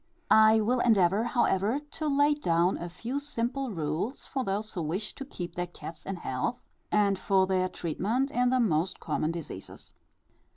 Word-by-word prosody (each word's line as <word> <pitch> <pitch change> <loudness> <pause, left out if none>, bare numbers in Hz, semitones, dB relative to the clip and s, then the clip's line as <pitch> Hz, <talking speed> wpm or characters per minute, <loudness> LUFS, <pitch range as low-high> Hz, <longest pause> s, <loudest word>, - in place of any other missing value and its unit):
I 220 0 +7
will 245 +4 +1
endeavour, 205 -2 +3
however, 235 -1 +1
to 310 - -3
lay 290 +1 +4
down 175 - +2
a 175 - -5
few 235 +10 -4
simple 270 -1 -2
rules 165 - -3
for 265 - -2
those 210 +1 -3
who 175 - -3
wish 180 +7 -3
to 275 - -7
keep 180 - -7
their 175 0 -3
cats 165 -2 -10
in 195 - -2
health, 170 - -2 0.3
and 200 -2 +3
for 190 0 +3
their 185 -1 +1
treatment 220 - -1
in 250 0 +2
the 255 0 +2
most 185 -5 +1
common 155 - -1
diseases. 165 - -8
205 Hz, 170 wpm, -29 LUFS, 175-245 Hz, 0.3 s, I